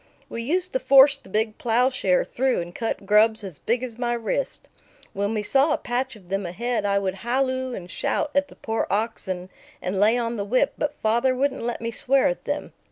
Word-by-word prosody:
We 230 Hz, -, -5 dB
used 355 Hz, +9 st, -1 dB
to -, -, +1 dB
force 275 Hz, -, +7 dB
the 275 Hz, -, -17 dB
big 215 Hz, +2 st, -1 dB
plowshare 235 Hz, -5 st, +2 dB
through 260 Hz, 0 st, 0 dB
and 175 Hz, 0 st, -6 dB
cut 225 Hz, -2 st, -3 dB
grubs 215 Hz, +2 st, +4 dB
as 185 Hz, -7 st, -8 dB
big 240 Hz, +2 st, 0 dB
as 240 Hz, -2 st, -6 dB
my 240 Hz, -1 st, 0 dB
wrist. 370 Hz, -, -3 dB, 0.5 s
When 200 Hz, +3 st, -1 dB
we 210 Hz, -, -1 dB
saw 275 Hz, +7 st, +3 dB
a -, -, +1 dB
patch 250 Hz, +1 st, -2 dB
of 195 Hz, -4 st, -17 dB
them 195 Hz, +1 st, -1 dB
ahead, 235 Hz, +6 st, -2 dB
I 200 Hz, 0 st, +2 dB
would 195 Hz, -2 st, 0 dB
halloo 260 Hz, +1 st, -1 dB
and 180 Hz, -, -7 dB
shout 295 Hz, -, -1 dB
at 285 Hz, 0 st, +2 dB
the -, -, -16 dB
poor 225 Hz, 0 st, -2 dB
oxen 190 Hz, -4 st, -2 dB, 0.3 s
and 190 Hz, +1 st, -2 dB
lay 215 Hz, +4 st, +4 dB
on 235 Hz, -1 st, -2 dB
the 200 Hz, -, -1 dB
whip; 255 Hz, +7 st, +1 dB
but 295 Hz, -, -2 dB
father 235 Hz, +4 st, +1 dB
wouldn't 270 Hz, +1 st, 0 dB
let 235 Hz, 0 st, -3 dB
me 230 Hz, 0 st, -2 dB
swear 265 Hz, +4 st, +2 dB
at -, -, -5 dB
them. -, -, -3 dB
235 Hz, 215 wpm, -24 LUFS, 205-260 Hz, 0.5 s, force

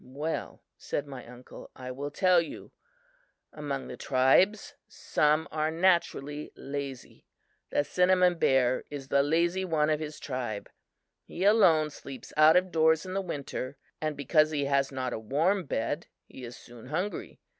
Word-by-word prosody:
"Well," 145 Hz, +5 st, -5 dB, 0.2 s
said 145 Hz, -, -3 dB
my 135 Hz, -3 st, -9 dB
uncle, 125 Hz, +1 st, -12 dB
"I 130 Hz, 0 st, -7 dB
will 140 Hz, +3 st, -5 dB
tell 180 Hz, +3 st, +4 dB
you. 165 Hz, -, -9 dB, 0.8 s
Among 145 Hz, -3 st, -4 dB
the -, -, -7 dB
tribes, 140 Hz, +11 st, +3 dB
some 150 Hz, +1 st, +1 dB
are 155 Hz, 0 st, 0 dB
naturally 160 Hz, -4 st, 0 dB
lazy. 140 Hz, -2 st, -7 dB, 0.4 s
The -, -, +1 dB
cinnamon 180 Hz, +1 st, +3 dB
bear 130 Hz, -3 st, +2 dB
is 140 Hz, -2 st, -7 dB
the 140 Hz, -, +4 dB
lazy 170 Hz, +5 st, +1 dB
one 155 Hz, -4 st, +1 dB
of 155 Hz, -, +1 dB
his 155 Hz, -1 st, -6 dB
tribe. 125 Hz, -6 st, -5 dB, 0.5 s
He 180 Hz, -, -6 dB
alone 175 Hz, -8 st, +5 dB
sleeps 135 Hz, -4 st, -10 dB
out 155 Hz, +1 st, +7 dB
of 180 Hz, 0 st, +3 dB
doors 160 Hz, 0 st, +3 dB
in 185 Hz, -, -6 dB
the 195 Hz, -, 0 dB
winter 140 Hz, -5 st, -5 dB, 0.2 s
and 155 Hz, -1 st, -2 dB
because 155 Hz, +2 st, +3 dB
he 145 Hz, -2 st, -1 dB
has 140 Hz, 0 st, +1 dB
not 130 Hz, -2 st, -3 dB
a -, -, -3 dB
warm 160 Hz, -, +1 dB
bed, 145 Hz, +6 st, -2 dB, 0.2 s
he 130 Hz, -, -12 dB
is 120 Hz, +1 st, -9 dB
soon 120 Hz, 0 st, -13 dB
hungry. 180 Hz, +8 st, -4 dB
150 Hz, 155 wpm, -29 LUFS, 135-170 Hz, 0.8 s, out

